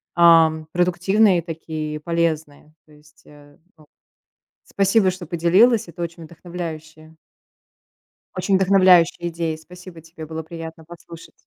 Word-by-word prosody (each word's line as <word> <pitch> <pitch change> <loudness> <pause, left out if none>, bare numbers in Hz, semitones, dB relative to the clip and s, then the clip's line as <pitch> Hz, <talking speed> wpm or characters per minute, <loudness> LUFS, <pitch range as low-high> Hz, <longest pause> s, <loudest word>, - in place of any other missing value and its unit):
ам, 165 -2 +4
продуктивные 180 +2 +2
такие 160 -2 -6
и 150 - -6
полезные. 160 -2 -3
То 155 - -25
есть, 150 0 -23
э, 145 -1 -18
ну, 180 +4 -39 0.9
спасибо, 195 0 +1
что 185 -1 -9
поделилась. 180 +7 +2
Это 170 +1 -9
очень 170 0 -7
вдохновляющие 160 -2 -9 1.2
очень 190 +1 +1
вдохновляющие 185 -3 +3
идеи. 165 -1 -4
Спасибо 180 +1 -14
тебе, 165 0 -12
было 160 +1 -6
приятно 160 0 -10
послушать. 170 0 -15
170 Hz, 120 wpm, -21 LUFS, 160-180 Hz, 1.2 s, ам